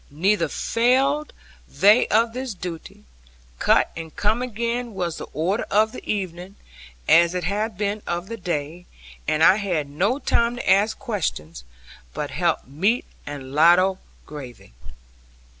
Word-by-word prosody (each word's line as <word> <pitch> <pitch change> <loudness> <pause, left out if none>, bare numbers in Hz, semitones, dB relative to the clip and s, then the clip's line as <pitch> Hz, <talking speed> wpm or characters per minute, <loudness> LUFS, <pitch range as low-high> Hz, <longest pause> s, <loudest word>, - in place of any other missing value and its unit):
Neither 170 +4 +1
failed 265 - +1 0.4
they 210 +5 +4
of 225 +1 +2
this 255 -3 -5
duty; 170 - -8 0.6
cut - - +3
and 160 -2 -8
come 215 +3 +1
again 235 -1 -3
was 175 -3 -3
the - - -7
order 180 +8 -1
of 215 +2 +3
the - - -9
evening, 185 -1 -5 0.5
as 170 +1 +5
it 180 - -2
had 205 +3 -2
been 205 +1 -2
of 175 +1 -3
the 230 - -5
day; 170 -2 -4 0.4
and 155 +1 +2
I 190 - +7
had 180 -8 -2
no 190 - 0
time 235 -4 +1
to 245 - -6
ask 205 +3 +3
questions, 150 - -4 0.5
but - - -4
help - - 0
meat 190 - 0 0.2
and 140 -2 -7
ladle 175 +5 +4 0.3
gravy. 130 - -10
195 Hz, 140 wpm, -23 LUFS, 165-225 Hz, 0.6 s, I